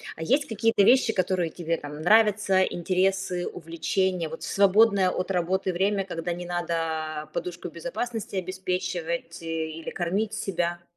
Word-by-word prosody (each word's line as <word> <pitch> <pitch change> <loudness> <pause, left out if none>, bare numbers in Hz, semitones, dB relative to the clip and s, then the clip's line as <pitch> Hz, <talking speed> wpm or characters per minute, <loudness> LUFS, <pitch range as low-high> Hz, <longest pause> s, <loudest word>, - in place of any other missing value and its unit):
А 160 - -6
есть 275 - +2
какие-то 225 -1 +2
вещи, 240 +1 +5
которые 185 -3 0
тебе 165 -1 -2
там 150 0 -8
нравятся, 205 0 +4
интересы, 185 0 0
увлечения, 175 +1 -1
вот 160 - -8
в - - -5
свободное 200 -1 +4
от 185 - -3
работы 185 +1 0
время, 195 +2 +1
когда 175 -1 -3
не 175 +1 -6
надо 160 -3 -2
подушку 175 -1 -4
безопасности 240 - -5
обеспечивать 180 -3 -3
или 160 0 -4
кормить 200 +5 -1
себя? 175 -5 -2
180 Hz, 135 wpm, -26 LUFS, 170-195 Hz, -, вещи